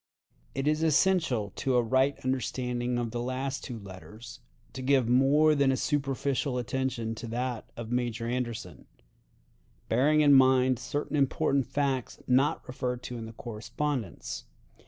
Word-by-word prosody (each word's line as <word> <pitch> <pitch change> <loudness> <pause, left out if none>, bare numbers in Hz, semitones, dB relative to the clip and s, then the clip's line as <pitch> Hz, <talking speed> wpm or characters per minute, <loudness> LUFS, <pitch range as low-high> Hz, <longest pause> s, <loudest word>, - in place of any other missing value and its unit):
It 135 +2 -1
is 155 +1 +2
essential 160 - +2
to 130 -2 0
a 120 - +4
right 130 +4 +2
understanding 125 -1 -1
of 120 -2 -2
the 120 - -3
last 130 +2 -3
two 120 - -6
letters 105 +3 -11 0.3
to 130 - -6
give 130 -2 +3
more 140 +5 +4
than 140 -2 +3
a 130 - 0
superficial 140 -2 -1
attention 125 -2 -2
to 115 +1 -7
that 120 0 -3
of 115 -1 -6
Major 120 -1 -1
Anderson, 120 - -4 1.0
bearing 145 +6 +4
in 145 -1 +6
mind 130 -1 +5
certain 130 +5 -3
important 140 -1 +1
facts 135 -3 -1
not 130 +3 +2
referred 125 -1 -3
to 120 -1 -6
in 115 - -6
the 110 - -10
correspondence. 115 - -4
130 Hz, 145 wpm, -29 LUFS, 120-135 Hz, 1.0 s, in